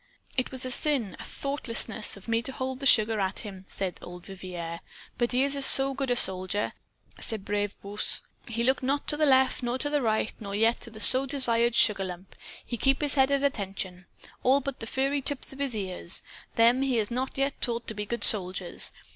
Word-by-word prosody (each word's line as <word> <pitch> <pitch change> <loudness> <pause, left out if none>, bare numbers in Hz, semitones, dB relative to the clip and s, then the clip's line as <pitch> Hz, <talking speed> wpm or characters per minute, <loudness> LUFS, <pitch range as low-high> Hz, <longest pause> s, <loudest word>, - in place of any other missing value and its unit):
"It 255 - -1
was 260 -1 0
a 255 - -2
sin 250 -7 +4
a - - -7
thoughtlessness 235 -7 -1
of 195 - -14
me 230 0 +1
to 250 - -3
hold 260 0 -5
the 275 - +1
sugar 220 -2 +4
at 190 -1 -1
him," 195 -4 -9
said 190 -2 -3
old 180 0 -10
Vivier. 175 -3 -7
"Ah, - - -38 0.3
but 240 -1 +1
he 255 +1 +2
is 280 0 +2
a 280 - -1
so 270 0 +5
good 265 -2 -1
soldier, 190 +1 0 0.5
ce - - -1
brave 205 0 -3
Bruce! 205 +1 -2 0.3
He 235 0 -2
look 265 +2 +2
not 275 +2 -1
to - - +4
the 305 0 +2
left 265 -1 +4
nor 240 0 -2
yet 260 - -4
to 290 - -2
the 295 -1 +1
right, 220 -2 0
nor 200 -2 -6
yet 225 +3 +2
to 235 - -8
the 220 -1 -12
so 260 +5 +6
desired 235 -4 +1
sugar 210 -4 +3
lump. 180 +1 -9 0.3
He 240 - -5
keep 270 +3 +2
his 290 -1 +3
head 265 -1 +3
at 280 0 +1
attention! 190 -8 -3 0.3
All 265 +2 +4
but 275 -1 -6
the 225 - -6
furry 275 +3 0
tips 275 0 0
of 270 - -13
his 275 -4 -1
ears. 185 -3 -1 0.3
Them 235 +3 +4
he 270 -2 0
has 220 0 -1
not 260 +3 -3
yet 275 +1 -1
taught 235 -1 0
to - - -3
be 210 -1 -5
good 235 +2 -3
soldiers. 185 -3 +2
235 Hz, 220 wpm, -27 LUFS, 205-270 Hz, 0.5 s, so